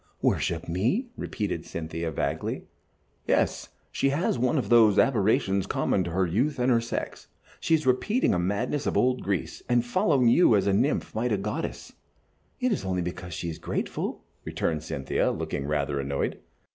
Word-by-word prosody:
"Worship -, -, 0 dB
me?" 115 Hz, -, 0 dB
repeated 100 Hz, -7 st, -3 dB
Cynthia, 80 Hz, 0 st, -4 dB
vaguely. 75 Hz, -, -2 dB, 0.6 s
"Yes, -, -, +1 dB, 0.2 s
she 135 Hz, -, +1 dB
has 140 Hz, -2 st, 0 dB
one 125 Hz, +5 st, +2 dB
of 130 Hz, -, -1 dB
those 110 Hz, -4 st, +6 dB
aberrations 100 Hz, -5 st, +2 dB
common 95 Hz, -, +1 dB
to -, -, -3 dB
her 95 Hz, +2 st, +1 dB
youth 125 Hz, -, 0 dB
and 125 Hz, +1 st, +2 dB
her 115 Hz, -1 st, +4 dB
sex. 115 Hz, -, -5 dB, 0.3 s
She 165 Hz, -, +3 dB
is 155 Hz, -, -2 dB
repeating 205 Hz, -, +2 dB
a 90 Hz, -, +1 dB
madness 120 Hz, +11 st, -1 dB
of -, -, 0 dB
old 125 Hz, 0 st, +2 dB
Greece, 95 Hz, -4 st, -3 dB
and 120 Hz, -1 st, +3 dB
following 140 Hz, -, +2 dB
you 120 Hz, -1 st, +6 dB
as 100 Hz, -2 st, +2 dB
a 100 Hz, -, +2 dB
nymph 100 Hz, -, +1 dB
might 120 Hz, +2 st, -1 dB
a 105 Hz, -, +2 dB
goddess." 105 Hz, +2 st, -4 dB, 0.7 s
"It 250 Hz, 0 st, +1 dB
is 205 Hz, -, -1 dB
only 90 Hz, -2 st, -1 dB
because 90 Hz, -1 st, -6 dB
she 85 Hz, -, -4 dB
is 80 Hz, -, -9 dB
grateful," -, -, -3 dB, 0.2 s
returned 80 Hz, -2 st, -2 dB
Cynthia, 70 Hz, -3 st, -1 dB
looking 70 Hz, -, -3 dB
rather 70 Hz, -2 st, -1 dB
annoyed. 70 Hz, 0 st, -2 dB
105 Hz, 170 wpm, -27 LUFS, 85-125 Hz, 0.7 s, those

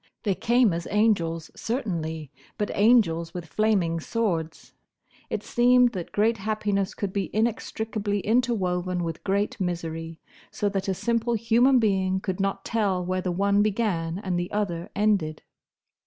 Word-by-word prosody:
They 200 Hz, -, +1 dB
came 235 Hz, 0 st, +3 dB
as 170 Hz, 0 st, -4 dB
angels, 175 Hz, -7 st, +1 dB
certainly, 160 Hz, -, -3 dB, 0.3 s
but 210 Hz, -, -1 dB
angels 190 Hz, -7 st, +3 dB
with 175 Hz, -2 st, -5 dB
flaming 180 Hz, -2 st, +1 dB
swords. 165 Hz, -5 st, -2 dB, 0.6 s
It -, -, -3 dB
seemed 245 Hz, 0 st, +4 dB
that 180 Hz, -6 st, -6 dB
great 225 Hz, +2 st, +2 dB
happiness 205 Hz, -1 st, -1 dB
could 195 Hz, -2 st, -3 dB
be 200 Hz, -2 st, -1 dB
inextricably 215 Hz, -2 st, -1 dB
interwoven 185 Hz, -6 st, 0 dB
with 165 Hz, -1 st, -5 dB
great 200 Hz, +2 st, 0 dB
misery, 165 Hz, -2 st, -4 dB, 0.3 s
so 205 Hz, -4 st, -1 dB
that 195 Hz, -1 st, -3 dB
a 190 Hz, -, 0 dB
simple 235 Hz, +3 st, 0 dB
human 235 Hz, +4 st, +4 dB
being 190 Hz, -4 st, +1 dB
could 190 Hz, -1 st, -4 dB
not 195 Hz, 0 st, -1 dB
tell 195 Hz, -5 st, 0 dB
where 185 Hz, +1 st, -1 dB
the 180 Hz, -, -2 dB
one 200 Hz, +3 st, +2 dB
began 195 Hz, -6 st, 0 dB
and 185 Hz, -3 st, -2 dB
the 175 Hz, -, -4 dB
other 195 Hz, -3 st, -2 dB
ended. 195 Hz, -7 st, +1 dB
200 Hz, 145 wpm, -26 LUFS, 175-220 Hz, 0.6 s, seemed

